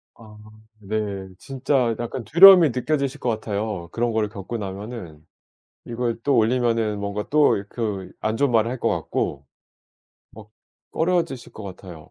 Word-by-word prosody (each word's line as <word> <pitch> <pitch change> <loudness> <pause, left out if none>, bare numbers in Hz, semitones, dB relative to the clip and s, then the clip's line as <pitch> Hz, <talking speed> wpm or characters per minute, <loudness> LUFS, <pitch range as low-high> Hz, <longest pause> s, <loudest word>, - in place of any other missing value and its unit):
아 110 -2 -15 0.4
네. 100 -2 -4
진짜 130 -3 0
약간 120 +1 -4
두려움이 175 0 +8
느껴지실 140 +2 -2
것 125 - -2
같아요, 105 -5 -3
그런 120 0 -1
거를 110 -2 0
겪고 105 +2 -6
나면은. 95 -5 -8 0.6
이걸 120 -1 -3
또 140 -3 +2
올리면은 115 -2 +1
뭔가 100 +1 -4
또 145 -9 +3
그 105 -5 -4
안 110 +1 -1
좋은 140 0 +2
말을 115 +1 +2
할 130 - -4
것 - - 0
같고 70 -1 -2 0.9
막 105 -1 -14 0.4
꺼려지실 165 -7 -1
것 110 - -10
같아요. 90 -4 -11
115 Hz, 280 characters per minute, -23 LUFS, 100-125 Hz, 0.9 s, 두려움이